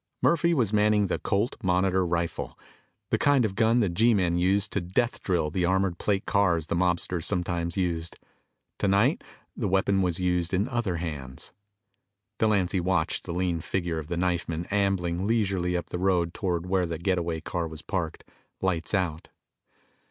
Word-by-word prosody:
Murphy 170 0 +3
was 120 - +1
manning 105 0 +3
the 95 - -1
Colt 105 +4 0
Monitor 95 -1 +2
rifle, 85 -1 -2 0.5
the - - +2
kind 140 -4 +4
of 100 - -2
gun 115 +3 +3
the 105 - +2
G 110 +7 +3
men 90 -4 +1
used 95 +4 +2
to 100 - 0
death 105 +8 -1
drill 85 -5 0
the 90 +2 -1
armor 95 +1 +2
plate 95 +3 -1
cars 90 -6 +2
the 80 - -2
mobsters 90 -1 +1
sometimes 85 -2 -1
used. 85 -3 -2 0.6
Tonight 100 - +2 0.3
the 110 - -2
weapon 95 +1 +2
was 90 -3 0
in 90 +3 0
other 120 -8 -1
hands. 75 -6 -5 0.9
Delancy 100 -4 +2
watched 90 -1 0
the 85 - -5
lean 90 -1 0
figure 85 -2 -2
of 75 - -7
the 85 +1 -3
knifeman 85 -2 -1
ambling 95 -2 0
leisurely 95 -6 +1
up 85 -1 -6
the 90 - -3
road 90 -3 +1
toward 90 -3 -2
where 90 -1 +1
the 85 -1 -3
get 90 +2 0
away 85 -1 -2
car 85 +1 -3
was 80 0 -9
parked, 85 -5 -3 0.4
lights 90 0 -1
out. 85 -4 -2
90 Hz, 165 wpm, -27 LUFS, 85-100 Hz, 0.9 s, kind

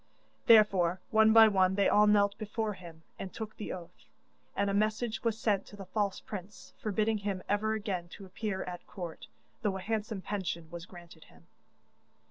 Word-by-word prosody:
Therefore 195 -6 +5
one 220 -1 +6
by 225 0 +9
one 190 -2 +3
they 200 - +3
all 210 0 +5
knelt 205 -1 +4
before 215 0 -2
him 170 -4 -12 0.2
and 190 - -5
took 220 -1 -7
the 210 - -5
oath, 175 -1 -10 0.5
and 200 - +1
a 200 - 0
message 215 +3 0
was 230 -2 0
sent 205 -4 0
to - - -12
the 195 -1 -9
false 200 0 -1
prince, 200 0 -9
forbidding 215 +1 0
him 200 -2 -3
ever 210 +2 +1
again 195 -5 -3
to 200 - -10
appear 190 +1 -4
at 180 -1 -8
court, 175 -4 -7 0.3
though 200 -3 0
a - - -7
handsome 215 -1 -3
pension 170 -5 -4
was 170 0 -8
granted 175 -3 -14
him. 80 0 -21
200 Hz, 180 wpm, -31 LUFS, 185-215 Hz, 0.5 s, by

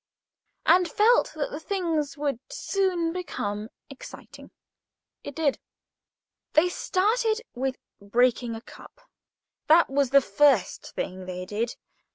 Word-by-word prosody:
and 360 -1 +5
felt 455 +7 +3
that 300 -2 -3
the 295 - -5
thing 335 -3 -1
would 285 -4 -2
soon 360 -4 -1
become 215 - -4 0.2
exciting. 275 - -12 0.7
It 285 - -8
did. 305 -4 0 0.9
They 335 +4 +4
started 435 +5 0
with 260 +1 -2 0.3
breaking 235 +2 +1
a 225 - -8
cup. - - -15 0.7
That 325 -1 +5
was 275 -1 +2
the 275 +2 +7
first 255 -2 +2
thing 185 0 -5
they 180 0 -5
did. 220 +5 -3
285 Hz, 120 wpm, -26 LUFS, 235-355 Hz, 0.9 s, the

